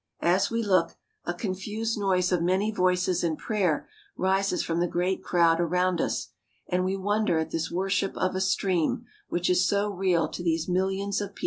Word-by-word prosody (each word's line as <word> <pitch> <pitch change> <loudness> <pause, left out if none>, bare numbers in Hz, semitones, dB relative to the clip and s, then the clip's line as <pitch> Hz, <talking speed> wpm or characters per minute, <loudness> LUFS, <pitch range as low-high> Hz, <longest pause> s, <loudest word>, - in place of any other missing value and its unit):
As 185 +3 +3
we 230 0 -1
look, 185 -5 +2 0.3
a 175 - -1
confused 210 +4 -3
noise 190 -3 +1
of 180 -2 +2
many 190 +5 +1
voices 180 -2 +1
in 160 -2 0
prayer 190 -8 0 0.3
rises 190 0 +1
from 165 0 -1
the 175 - +2
great 180 +2 -1
crowd 170 -1 +3
about 180 +1 +1
us, - - -2 0.4
and 180 +1 0
we 190 +1 0
wonder 205 -2 +1
at 160 0 -2
this 165 -1 -2
worship 195 +2 -1
of 185 - 0
a 185 - -1
stream, 190 -3 0 0.2
which 175 0 -1
is 180 +1 +3
so 205 +1 +1
real 180 -4 +1
to 175 - -7
these 165 -2 0
millions 190 +2 0
of 205 -1 -6
people. - - -14
185 Hz, 190 wpm, -27 LUFS, 175-195 Hz, 0.4 s, As